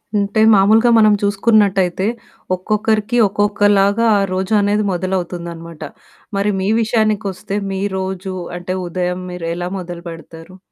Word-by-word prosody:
అంటే 205 +1 +1
మాములుగా 215 +4 +4
మనం 215 -1 +5
చూసుకున్నట్టయితే 200 -3 +2 0.5
ఒక్కొక్కరికి 215 +4 -1
ఒక్కొక్కలాగా 205 +1 +2
ఆ - - +1
రోజు 190 +3 -2
అనేది 205 +1 +1
మొదలవుతుందన్నమాట. 170 -3 -4 0.6
మరి 200 +1 +1
మీ 190 - -1
విషయానికొస్తే 210 -3 -1
మీ 190 0 -3 0.2
రోజు 190 0 -4 0.2
అంటే 180 +1 -4
ఉదయం 180 +1 -2
మీరు 180 -2 -6
ఎలా 175 +1 -4
మొదలు 175 -1 -8
పెడతారు? 165 +2 -12
195 Hz, 120 wpm, -17 LUFS, 180-210 Hz, 0.6 s, మనం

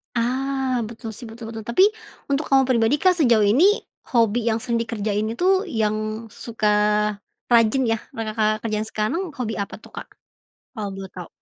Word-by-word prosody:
Ah! 260 +2 0
Betul 225 0 -8
sih. 230 +3 -10
Betul 225 0 -9
betul. 225 -1 -7
Tapi, 235 +11 +4 0.5
untuk 280 +2 0
kamu 270 -1 +5
pribadi, 235 0 +3
Kak, 360 +3 +2
sejauh 235 -7 +4
ini 310 - +4 0.3
hobi 230 0 +3
yang 225 0 +1
sering 235 -2 0
dikerjain 215 -2 -1
itu, 375 - +1
yang 215 -3 -2
suka 225 -1 -3 0.8
rajin 235 +2 +4
ya, 225 -2 +1 0.2
yang, 225 -1 -3
Kakak, 215 -1 0
kerjain 215 -1 -2
sekarang, 220 - -1
hobi 225 -5 -3
apa 200 - -4
tuh, - - -16
Kak? - - -8 0.7
Kalau 210 -4 -4
boleh 195 -1 -8
tahu. 180 -3 -9
230 Hz, 170 wpm, -23 LUFS, 215-255 Hz, 0.8 s, kamu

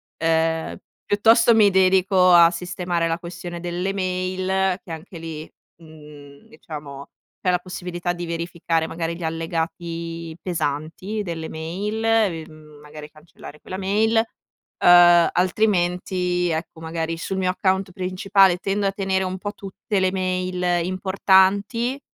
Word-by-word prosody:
Ehm, 160 0 0 0.3
piuttosto 225 +3 +4
mi 215 -2 +5
dedico 185 -1 +4
a 170 -1 +8
sistemare 175 -1 -2
la 165 +1 -1
questione 175 0 -7
delle 175 +3 -3
mail, 185 0 -1
che 170 - -12
anche 170 +2 -9
lì, 160 -1 -8 0.3
mhmm, 150 -3 -15
diciamo, 145 -3 -10 0.3
c'è 180 - +2
la 180 - +1
possibilità 180 -1 -4
di 175 0 -6
verificare 165 -1 -2
magari 165 0 -4
gli 175 - -8
allegati 165 0 -4
pesanti 165 +5 -3
delle 165 -4 -5
mail, 190 +8 -4
e, 210 -8 +1
mhmm, 155 -1 -16
magari 150 0 -11
cancellare 155 -1 -14
quella 185 - -7
mail, 210 +4 +1 0.6
uhm, 175 -1 +7
altrimenti, 180 -2 0
ecco 160 0 -4
magari 165 0 -3
sul 190 +3 -4
mio 185 -1 0
account 190 0 0
principale, 185 +1 +2
tendo 200 +2 -2
a - - +1
tenere 190 -1 -1
un 185 0 -4
po' 205 +2 -5
tutte 200 +1 -4
le 185 0 +2
mail 185 -2 -1
importanti, 195 +6 +2
180 Hz, 135 wpm, -22 LUFS, 165-190 Hz, 0.6 s, a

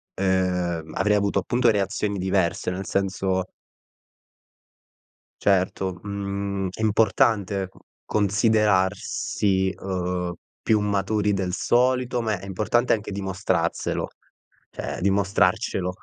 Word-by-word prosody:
uhm, 90 -4 0
avrei 105 +2 +2
avuto 100 -1 +1
appunto, 120 +5 +2
reazioni 100 0 0
diverse, 95 -1 0
nel 95 +2 -4
senso 95 -1 0 2.0
Certo, 95 -1 +1
mhmm, 100 -1 -3
è 110 - -10
importante 105 -2 +2
c - - -25 0.3
considerarsi, 100 -2 +1
uhm, 90 -2 -2 0.3
più 110 -2 +2
maturi 105 +1 +1
del 95 -2 -1
solito, 125 +1 +2
ma 110 -5 -1
è - - -10
importante 105 +5 +1
anche, 105 -2 -1
dimostrarselo, 95 -3 -1 0.6
cioè - - -5
dimostrarcelo. 95 -1 +1
100 Hz, 95 wpm, -24 LUFS, 95-105 Hz, 2.0 s, avrei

